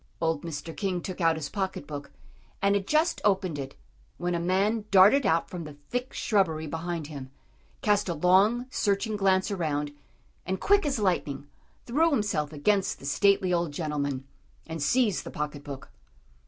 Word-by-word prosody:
Old 160 Hz, -2 st, 0 dB
Mr. 165 Hz, 0 st, -6 dB
King 190 Hz, -3 st, -1 dB
took 185 Hz, +1 st, -6 dB
out 165 Hz, -1 st, +4 dB
his 155 Hz, -3 st, -4 dB
pocket 190 Hz, -1 st, -3 dB
book, 145 Hz, -1 st, -7 dB, 0.5 s
and 200 Hz, 0 st, +3 dB
had 200 Hz, -1 st, 0 dB
just 315 Hz, +3 st, +2 dB
opened 190 Hz, -7 st, +1 dB
it, 135 Hz, 0 st, -6 dB, 0.4 s
when 175 Hz, 0 st, -1 dB
a 170 Hz, -, 0 dB
man 200 Hz, +5 st, +1 dB
darted 205 Hz, +8 st, +6 dB
out 165 Hz, +1 st, +2 dB
from 175 Hz, -2 st, -6 dB
the 150 Hz, -2 st, -9 dB
thick 245 Hz, +1 st, -2 dB
shrubbery 165 Hz, -7 st, +1 dB
behind 165 Hz, +1 st, -4 dB
him, 140 Hz, -3 st, -8 dB, 0.5 s
cast 205 Hz, -2 st, +2 dB
a 170 Hz, -, -1 dB
long, 195 Hz, +9 st, +4 dB
searching 210 Hz, 0 st, 0 dB
glance 195 Hz, 0 st, +2 dB
around, 150 Hz, -6 st, -1 dB, 0.5 s
and 190 Hz, 0 st, -2 dB
quick 405 Hz, -5 st, +3 dB
as 275 Hz, -, 0 dB
lightning, 170 Hz, -9 st, -1 dB, 0.4 s
threw 310 Hz, +8 st, +3 dB
himself 205 Hz, -, 0 dB
against 190 Hz, +6 st, +1 dB
the -, -, -12 dB
stately 190 Hz, +4 st, +3 dB
old 170 Hz, -3 st, 0 dB
gentleman, 145 Hz, -4 st, -2 dB, 0.4 s
and 160 Hz, -1 st, -6 dB
seized 215 Hz, -, +2 dB
the -, -, -7 dB
pocket 150 Hz, -1 st, -4 dB
book. 140 Hz, -2 st, -8 dB
180 Hz, 165 wpm, -28 LUFS, 150-205 Hz, 0.5 s, darted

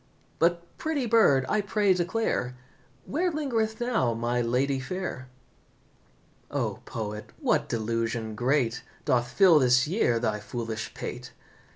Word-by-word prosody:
But, 170 Hz, +1 st, +2 dB
pretty 310 Hz, -5 st, -1 dB
bird, 215 Hz, -, +4 dB
I 215 Hz, -, +1 dB
pray 205 Hz, -1 st, +2 dB
declare 175 Hz, -, -1 dB, 0.5 s
Where 350 Hz, +5 st, 0 dB
lingereth 230 Hz, -8 st, -1 dB
now 230 Hz, -, +1 dB
my 120 Hz, +1 st, 0 dB
lady 130 Hz, +3 st, +1 dB
fair?" 150 Hz, -3 st, -5 dB, 1.2 s
"O, -, -, -2 dB
poet, 105 Hz, -1 st, -5 dB
what -, -, +1 dB
delusion 115 Hz, 0 st, -2 dB
great 125 Hz, +1 st, +1 dB, 0.2 s
Doth 120 Hz, -1 st, +2 dB
fill 170 Hz, +4 st, +6 dB
this 125 Hz, +1 st, +4 dB
year 155 Hz, -, +2 dB
thy 110 Hz, -2 st, -1 dB
foolish 110 Hz, +1 st, -5 dB
pate? -, -, -6 dB
130 Hz, 120 wpm, -27 LUFS, -, 1.2 s, fill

